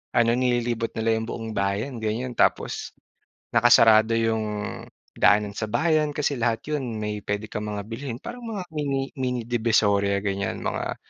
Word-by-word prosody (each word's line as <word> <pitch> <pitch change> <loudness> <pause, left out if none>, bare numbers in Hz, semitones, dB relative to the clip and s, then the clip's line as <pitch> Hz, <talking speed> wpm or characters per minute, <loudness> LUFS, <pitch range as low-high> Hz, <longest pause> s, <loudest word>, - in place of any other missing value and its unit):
ano 115 -1 +4
nililibot 120 -2 0
nila 115 0 +1
'yung 110 - -5
buong 115 -1 -5
bayan 100 +6 -1
ganyan. 120 +3 -2
Tapos - - +1 0.6
nakasarado 110 -2 +6
'yung 110 -2 -2 0.3
daanan 105 0 +4
sa 110 - -2
bayan 150 +6 +2
kasi 145 -1 0
lahat 115 -1 +1
'yun 135 -7 -2
may 105 0 -3
puwede 105 +1 -3
kang 105 0 -4
mga 105 -1 -3
bilhin 115 +1 -5
parang 240 0 -7
mga 215 -4 -4
mini 140 -3 -2
mini 125 -2 -1
divisoria 105 -4 +2
ganyan, 100 -1 -2
mga - - -2
115 Hz, 150 wpm, -25 LUFS, 105-125 Hz, 0.6 s, nakasarado